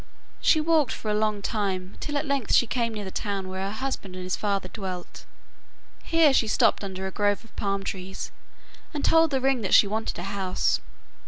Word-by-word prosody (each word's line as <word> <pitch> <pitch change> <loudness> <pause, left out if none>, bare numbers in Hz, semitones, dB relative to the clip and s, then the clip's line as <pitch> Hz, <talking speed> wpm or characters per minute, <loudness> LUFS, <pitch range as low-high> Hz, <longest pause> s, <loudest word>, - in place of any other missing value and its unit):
She 315 - +5
walked 310 -5 +2
for 215 - -3
a - - +1
long 210 -1 0
time, 195 -4 -2
till 295 -1 -2
at 285 - -1
length 280 -4 +1
she - - +5
came 230 -1 -1
near 210 -1 -4
the 190 - -6
town 200 -2 -3
where 190 0 -4
her - - -4
husband 220 -7 -4
and 185 - -6
his 185 0 -1
father 200 -3 -1
dwelt. 185 -3 -7 0.8
Here 325 -4 +4
she 230 - +3
stopped 215 - +3
under 190 -1 -5
a 190 - -3
grove 205 +2 +1
of 225 - -20
palm 195 -1 -1
trees, 190 0 -5 0.6
and 290 - -1
told 325 0 +5
the 270 -2 +1
ring 265 -2 +2
that 190 - +3
she - - +8
wanted 220 +2 -2
a 175 - -5
house. 195 -1 0
205 Hz, 210 wpm, -26 LUFS, 190-260 Hz, 0.8 s, she